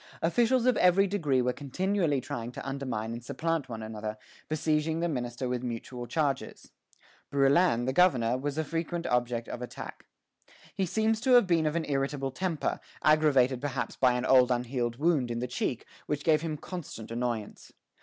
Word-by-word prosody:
Officials 240 +8 +3
of 255 - +4
every 180 +2 +5
degree 150 -10 +1
were 125 0 +1
continually 165 +2 0
trying 120 -1 -5
to - - -7
undermine 130 -5 -3
and 120 0 -7
supplant 160 +1 -2
one 110 -2 -5
another, 110 0 -5 0.3
besieging 155 +1 0
the 170 - +1
minister 125 -4 -3
with 125 -1 -2
mutual 120 0 -5
charges. 145 -3 -2 0.6
Brouillan, 140 -2 +3
the 130 - 0
governor, 130 -9 +4
was 140 +3 -3
a 160 - +1
frequent 165 +2 -3
object 120 -1 0
of 120 - -6
attack. 125 - -8 0.7
He 190 -2 -1
seems 220 +3 +1
to 255 +1 +3
have 245 -3 +7
been 165 -3 +2
of 150 - -1
an 165 -1 0
irritable 135 -1 -1
temper, 170 +2 -2 0.2
aggravated 140 -5 +4
perhaps 145 -2 -3
by 130 -2 +3
an 125 +1 -1
old 130 -1 +6
unhealed 120 -1 -1
wound 145 -3 +1
in 120 - -2
the 120 - -2
cheek, 125 -1 -3 0.2
which 150 -1 -2
gave 155 -2 +3
him 160 -2 -3
constant 150 - -7
annoyance. 115 -3 -4
140 Hz, 175 wpm, -29 LUFS, 125-165 Hz, 0.7 s, have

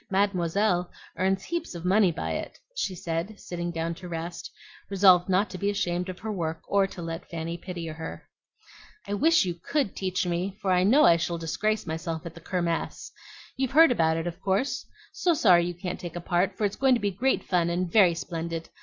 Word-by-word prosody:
Mademoiselle 190 -1 +1 0.3
earns 190 +2 +1
heaps 340 - -4
of 170 0 -7
money 190 0 +4
by 165 - -4
it," - - -4 0.2
she 200 - -2
said, 170 +5 -4
sitting 175 -1 -4
down 165 0 -2
to 180 +1 -10
rest, 170 +1 -5 0.4
resolved 190 -2 +5
not 190 +3 +3
to 185 - -8
be 200 - +1
ashamed 180 -2 -1
of 185 - -6
her 220 +2 -5
work 165 -5 -3
or 200 -1 +3
to 180 -2 -8
let 165 0 -6
Fanny 165 0 -4
pity 175 -1 -6
her. 160 0 -7 0.8
"I 205 - -2
wish 325 - +4
you 175 - -1
COULD 210 - -2
teach 185 -1 -1
me, 180 +3 -2
for 190 - 0
I 180 0 +4
know 255 +10 +6
I 170 - +6
shall 170 +1 -2
disgrace 210 +6 -1
myself 160 0 -4
at 170 - -6
the 170 - -13
Kirmess. 170 -1 -2 0.4
You've 265 -1 -1
heard 320 -1 +7
about 160 -7 +2
it, 165 - -3
of 175 -1 -5
course? 200 +8 0 0.3
So 345 -2 +2
sorry 175 - +5
you 175 - -4
can't 180 0 -5
take 175 -2 -7
a - - -3
part, 180 +2 0
for 215 - +1
it's 200 0 -1
going 265 -1 +4
to - - -1
be 205 -2 0
great 250 +8 0
fun 175 -2 +1
and 180 +1 0
very 180 -2 +5
splendid. 165 -1 -5
180 Hz, 210 wpm, -27 LUFS, 170-200 Hz, 0.8 s, heard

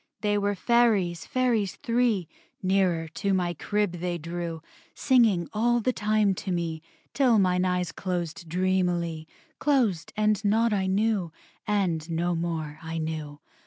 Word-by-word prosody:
They 205 -1 +1
were 205 0 0
Fairies, 205 -7 +2
Fairies 235 -7 +1
three: 230 -7 0 0.4
Nearer 185 -4 +1
to 195 +4 -1
my 175 -2 0
crib 205 0 -1
they 175 0 -2
drew, 170 0 -5 0.3
Singing 225 -9 +3
all 240 +3 +2
the 255 +2 0
time 210 -2 +2
to 190 +1 -5
me, 165 -2 -2 0.3
Till 255 -5 +4
mine 180 -2 +2
eyes 180 -1 0
closed 175 -3 -4
dreamily, 175 -3 0 0.3
Closed, 240 - +1
and 215 -1 +2
naught 220 +2 +2
I 190 -2 0
knew, 195 -3 +1 0.4
And 180 -6 0
no 170 +2 0
more 160 -3 -3
I 165 0 -5
knew. 155 -2 -4
185 Hz, 140 wpm, -27 LUFS, 170-210 Hz, 0.4 s, Till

